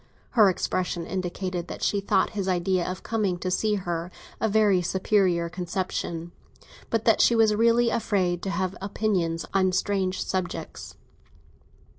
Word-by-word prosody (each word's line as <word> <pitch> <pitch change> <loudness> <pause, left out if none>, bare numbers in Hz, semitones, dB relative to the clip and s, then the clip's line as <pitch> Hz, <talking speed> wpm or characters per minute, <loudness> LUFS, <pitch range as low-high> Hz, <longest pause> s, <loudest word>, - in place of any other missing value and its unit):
Her 215 -5 +6
expression 180 -2 -2
indicated 180 -1 -3
that - - -7
she 200 - +1
thought 195 - +1
his 200 -3 -3
idea 180 0 0
of 185 0 -6
coming 205 -6 -1
to 185 +1 -3
see 210 +3 +1
her 175 -3 -3 0.3
a 220 - +1
very 205 -3 +3
superior 185 -1 +1
conception, 175 -1 -4 0.6
but 225 -1 -1
that 225 - +4
she 235 - +5
was 220 -2 +4
really 230 +2 +3
afraid 185 -6 0
to 195 - -3
have 185 +1 -2
opinions 190 -5 -1
on 190 -1 +3
strange 190 0 0
subjects. 185 -2 -4
185 Hz, 145 wpm, -26 LUFS, 175-210 Hz, 0.6 s, Her